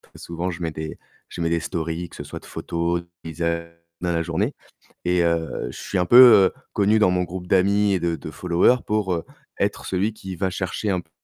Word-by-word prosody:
souvent 85 +2 -4
je 85 0 -6
mets 80 - -1
des 80 0 -6 0.3
je 85 - -6
mets 85 - +1
des 85 - +2
stories, 80 +1 -4
que - - -14
ce - - -7
soit - - -8
de - - -18
photos, 85 +1 -2
de 85 - -21
paysages 85 +1 -3 0.3
dans 90 - 0
la 85 0 0
journée 80 -1 -1 0.5
et 90 0 +2
heu, 85 -1 -1
je - - -11
suis - - -2
un 90 - +2
peu, 120 -3 +9
heu, - - -20 0.2
connu 105 +1 +3
dans 95 - +4
mon 90 0 +1
groupe 90 0 -6
d'amis 100 +2 +3
et 95 - +1
de 85 0 0
de 80 - -8
followers 90 - +3
pour, 105 -4 0
heu, 85 - -3 0.3
être - - -1
celui 95 +4 0
qui 95 -3 -8
va 95 -1 0
chercher 95 +3 -3
un 90 -2 0
p 80 - -29
90 Hz, 230 wpm, -23 LUFS, 85-95 Hz, 0.5 s, peu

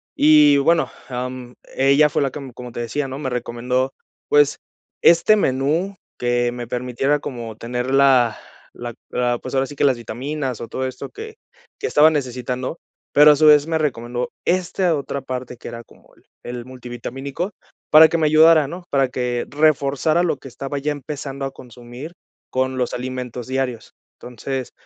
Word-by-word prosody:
y 150 -1 +6
bueno, 160 +4 +2 0.2
am, 125 0 -5 0.2
ella 140 +3 +4
fue 150 - 0
la 135 -2 0
que, 150 - -7
mm, 135 -2 -9
como 125 0 -9
te 120 - -4
decía, 135 +5 -2
¿no? 135 0 -6
Me 135 - -3
recomendó, 125 +2 -2 0.3
pues, 145 -1 +4 0.4
este 170 +6 +6
menú 160 +5 0 0.2
que 120 0 +1
me 120 -1 -6
permitiera 125 +4 -1
como 120 -6 -6
tener 125 +3 -3
la 130 -5 +4 0.4
la 120 0 -7 0.2
la 120 -1 0
pues - - -8
ahora 135 0 +2
sí 145 - -10
que - - -1
las 135 -3 +3
vitaminas, 130 +3 -4
o 115 - -5
todo 130 +3 -3
esto 130 - -7
que 440 +2 -9 0.4
que 435 - -3
estaba 155 - +6
necesitando, 130 -1 -3 0.4
pero 150 +1 +8
a - - +5
su 155 - +3
vez 150 -1 +7
me 165 -1 0
recomendó 125 -5 -2 0.2
esta 180 0 +1
otra 140 -1 -4
parte 130 -1 -6
que - - -10
era 115 0 -8
como - - -22
el - - -26 0.2
el 120 -1 -6
multivitamínico, 130 - -6 0.4
para 155 +1 +9
que 170 - 0
me 155 -2 +2
ayudara, 155 0 +6
¿no? 175 +5 -8
Para 135 -1 +2
que 125 -1 -2
reforzara 150 +2 +2
lo 165 -5 0
que 135 - -12
estaba 135 +3 -5
ya 145 +2 -1
empezando 140 -1 -5
a 135 - -4
consumir 125 +4 -11 0.4
con 130 0 -1
los 125 -1 -1
alimentos 125 -1 -5
diarios. 130 -3 -3 0.3
Entonces, 125 +2 -5
135 Hz, 175 wpm, -21 LUFS, 125-150 Hz, 0.4 s, para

